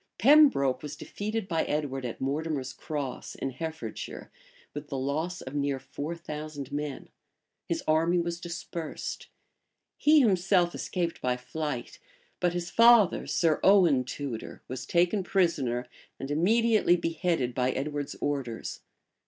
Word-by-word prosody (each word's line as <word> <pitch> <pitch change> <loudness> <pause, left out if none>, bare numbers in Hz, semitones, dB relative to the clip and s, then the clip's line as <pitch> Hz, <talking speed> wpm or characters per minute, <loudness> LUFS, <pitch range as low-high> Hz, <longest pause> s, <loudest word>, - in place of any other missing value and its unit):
Pembroke 230 - +5
was 150 0 -6
defeated 210 +5 -4
by 165 -3 +1
Edward 140 -3 -2
at 120 - -5
Mortimer's 140 -1 -2
Cross, 140 -2 -5
in 135 - -3
Herefordshire, 160 +4 -6 0.4
with 145 0 -6
the 140 - -4
loss 155 +7 -2
of 130 - -8
near 140 -1 0
four 145 +5 -6
thousand 150 -4 -7
men: 145 -1 -4 0.6
his 165 -1 -2
army 165 +3 +3
was 170 0 -1
dispersed; 170 -2 -6 0.7
he 305 +1 +6
himself 185 -5 +3
escaped 170 -2 -3
by 125 0 0
flight; 145 0 -5 0.4
but 175 -1 +1
his 175 +1 -3
father, 230 -4 +6
Sir 165 -3 +2
Owen 175 -10 +5
Tudor, 130 -2 -6
was 130 -1 -6
taken 180 +4 +2
prisoner, 145 -11 +1 0.3
and 135 - -5
immediately 215 +4 +4
beheaded 165 -6 -1
by 125 +1 +1
Edward's 145 +2 -3
orders. 135 -6 -3
155 Hz, 130 wpm, -28 LUFS, 135-175 Hz, 0.7 s, he